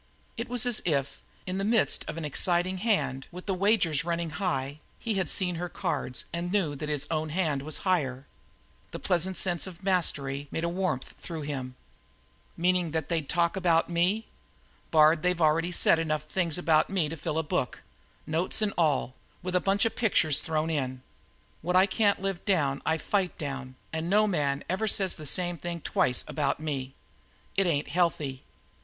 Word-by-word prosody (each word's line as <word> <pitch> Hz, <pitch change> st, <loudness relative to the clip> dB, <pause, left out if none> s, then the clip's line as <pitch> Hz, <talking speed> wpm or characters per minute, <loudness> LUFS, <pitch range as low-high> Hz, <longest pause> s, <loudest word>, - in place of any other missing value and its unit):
It 235 Hz, +2 st, -4 dB
was 245 Hz, 0 st, +2 dB
as 245 Hz, -3 st, +2 dB
if, 140 Hz, -5 st, -1 dB, 0.2 s
in 185 Hz, +1 st, -3 dB
the -, -, -1 dB
midst 220 Hz, +1 st, +2 dB
of 150 Hz, -, -5 dB
an 165 Hz, -, -3 dB
exciting 175 Hz, +5 st, +1 dB
hand, 145 Hz, -, 0 dB
with 180 Hz, +1 st, -9 dB
the 195 Hz, -, 0 dB
wagers 185 Hz, -6 st, +2 dB
running 170 Hz, -1 st, -2 dB
high, 145 Hz, -5 st, -2 dB, 0.2 s
he 230 Hz, -, -2 dB
had 190 Hz, -3 st, 0 dB
seen 180 Hz, -3 st, 0 dB
her 180 Hz, -, -3 dB
cards 150 Hz, -10 st, -2 dB
and 170 Hz, +1 st, -2 dB
knew 185 Hz, -7 st, +1 dB
that 150 Hz, +2 st, -5 dB
his 150 Hz, -1 st, +1 dB
own 155 Hz, -1 st, -1 dB
hand 155 Hz, -4 st, 0 dB
was 155 Hz, +2 st, -3 dB
higher. 140 Hz, -8 st, 0 dB, 0.6 s
The -, -, -6 dB
pleasant 180 Hz, +1 st, 0 dB
sense 175 Hz, -1 st, 0 dB
of 185 Hz, 0 st, -11 dB
mastery 145 Hz, -7 st, 0 dB
made 160 Hz, -, -3 dB
a 170 Hz, -, +1 dB
warmth 180 Hz, -7 st, -2 dB
through 165 Hz, -3 st, -6 dB
him. 130 Hz, -3 st, -4 dB, 0.8 s
"Meaning 180 Hz, 0 st, +2 dB
that 160 Hz, -1 st, -2 dB
they'd 160 Hz, -4 st, -1 dB
talk 170 Hz, -1 st, +2 dB
about 175 Hz, -3 st, +2 dB
me? 185 Hz, +6 st, +1 dB, 0.6 s
Bard, 155 Hz, 0 st, +5 dB
they've 180 Hz, -1 st, +1 dB
already 165 Hz, +2 st, +3 dB
said 170 Hz, -1 st, +3 dB
enough 155 Hz, -2 st, -1 dB
things 170 Hz, 0 st, -1 dB
about 160 Hz, -3 st, +3 dB
me 185 Hz, -5 st, +1 dB
to 160 Hz, -, -5 dB
fill 155 Hz, 0 st, -3 dB
a 160 Hz, -, +1 dB
book 150 Hz, -, -2 dB, 0.4 s
notes 165 Hz, +6 st, +1 dB
and 205 Hz, -, +1 dB
all, 145 Hz, -6 st, +2 dB, 0.3 s
with 185 Hz, 0 st, -2 dB
a 180 Hz, -, +4 dB
bunch 200 Hz, +2 st, +2 dB
of 225 Hz, -, 0 dB
pictures 160 Hz, -, +3 dB
thrown 160 Hz, -1 st, -1 dB
in. 130 Hz, -4 st, -2 dB, 0.6 s
What 180 Hz, +3 st, -1 dB
I 185 Hz, +1 st, +7 dB
can't 200 Hz, +1 st, +2 dB
live 195 Hz, -2 st, -3 dB
down 145 Hz, -9 st, +1 dB
I 160 Hz, 0 st, +3 dB
fight 190 Hz, +2 st, -1 dB
down, 135 Hz, -3 st, -5 dB, 0.2 s
and 160 Hz, +1 st, -2 dB
no 210 Hz, +2 st, +5 dB
man 145 Hz, -8 st, 0 dB
never 190 Hz, +5 st, 0 dB
says 190 Hz, -2 st, +2 dB
the 155 Hz, -2 st, -6 dB
same 175 Hz, +2 st, +2 dB
thing 170 Hz, +1 st, -5 dB
twice 125 Hz, -3 st, +1 dB
about 145 Hz, -2 st, -1 dB
me. 135 Hz, -4 st, -4 dB, 0.6 s
It 195 Hz, -2 st, +3 dB
ain't 145 Hz, -4 st, 0 dB
healthy. 155 Hz, -7 st, 0 dB
170 Hz, 185 wpm, -28 LUFS, 150-185 Hz, 0.8 s, I